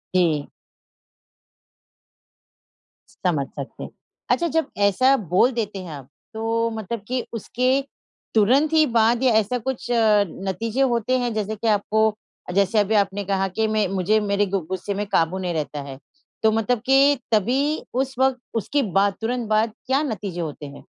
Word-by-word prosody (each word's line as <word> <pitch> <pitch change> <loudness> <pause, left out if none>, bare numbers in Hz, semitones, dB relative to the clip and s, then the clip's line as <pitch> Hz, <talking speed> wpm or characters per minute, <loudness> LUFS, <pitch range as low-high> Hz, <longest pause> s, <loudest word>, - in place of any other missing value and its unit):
जी। 160 -5 +2 2.8
समझ 145 -6 0
सकते 140 -1 -7
हैं। - - -7 0.4
अच्छा 340 - +2
जब 320 - +2 0.2
ऐसा 255 +7 +4
बोल 215 +8 +4
देते 215 -4 -3
हैं 170 - -8
आप, 140 -2 -9 0.2
तो 225 +1 0
मतलब 220 0 -5
कि 250 0 -2
उसके 250 +3 -1 0.6
तुरंत 270 +9 +4
ही 310 -1 +5
बाद 235 +1 +2
या 250 -3 +4
ऐसा 220 +3 +2
कुछ 260 +1 -4
नतीजे 210 +1 +1
होते 245 +3 +1
हैं 240 -2 -1
जैसे 215 0 -2
कि 225 +2 -3
आपको 215 +1 +2 0.4
जैसे 200 +2 +3
अभी 210 +2 +1
आपने 200 0 +1
कहा 195 0 0
कि 220 0 +1
मैं 215 -2 +1
मुझे 195 +3 +1
मेरे 205 0 +1
गु 195 0 -1
गुस्से 190 +2 -3
में 205 +1 -2
काबू 170 0 +1
नहीं 180 -2 -2
रहता 150 -2 -3
है। 135 -1 -8 0.5
तो 220 - +5
मतलब 225 +2 +1
कि 275 +2 +5 0.2
तभी 225 +5 +2 0.3
उस 265 +1 -1
वक़्त, 265 -1 +2
उसके 255 +6 0 0.2
बाद 200 0 +3
तुरंत 235 0 -2
बाद 215 +1 +2
क्या 270 +2 +2
नतीजे 205 - -4
होते 150 -2 -6
हैं? 140 0 -11
215 Hz, 160 wpm, -23 LUFS, 195-240 Hz, 2.8 s, ही